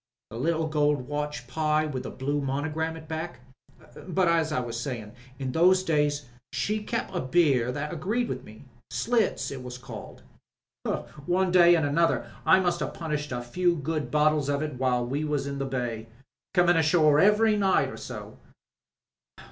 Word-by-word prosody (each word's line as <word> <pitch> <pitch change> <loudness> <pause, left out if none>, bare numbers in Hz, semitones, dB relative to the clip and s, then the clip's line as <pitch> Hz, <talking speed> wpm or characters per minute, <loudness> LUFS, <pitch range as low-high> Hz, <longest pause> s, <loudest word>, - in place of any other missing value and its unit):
The 115 - -6
little 160 +5 0
gold 150 -4 +1
watch, 150 -3 -3
Pye, 155 +3 +1
with 135 -4 -3
the - - -6
blue 145 +2 -2
monogram 155 +4 -2
at 160 - -10
the - - -15
back. 160 -2 -5 0.7
But, 185 0 +2
as 165 -2 +2
I 150 - +1
was 120 -1 -4
sayin', 120 -5 -5 0.3
in 130 -2 -3
those 185 +5 +4
days 150 -4 +1 0.3
she 205 +12 -1
kep' 230 +2 -3
a - - -1
beer 130 -4 +2
that 145 +3 -4
agreed 235 +6 -1
with - - -4
me 110 +6 -14
— - - -39
Slits 235 -2 0
it 135 -2 -6
was 125 0 -7
called. 125 - -10 1.0
One 185 +1 +2
way 175 -1 +7
an' 160 -3 +1
another 165 +4 +1 0.2
I 190 - +7
must 175 -2 0
'ave - - -4
punished 150 -3 -3
a - - -1
good - - -10
few 175 +7 +1
bottles 150 -1 +1
of 140 +1 0
it 150 -5 -5
while 125 -2 +1
we 140 +5 -2
was 150 -2 -1
in 140 0 -4
the 135 - -1
bay 120 -4 -3 0.2
— - - -66
comin' 175 -1 +5
ashore 155 -2 +4
every 210 +3 +5
night 195 -2 +2
or - - -8
so. - - -8
150 Hz, 185 wpm, -27 LUFS, 135-170 Hz, 1.0 s, way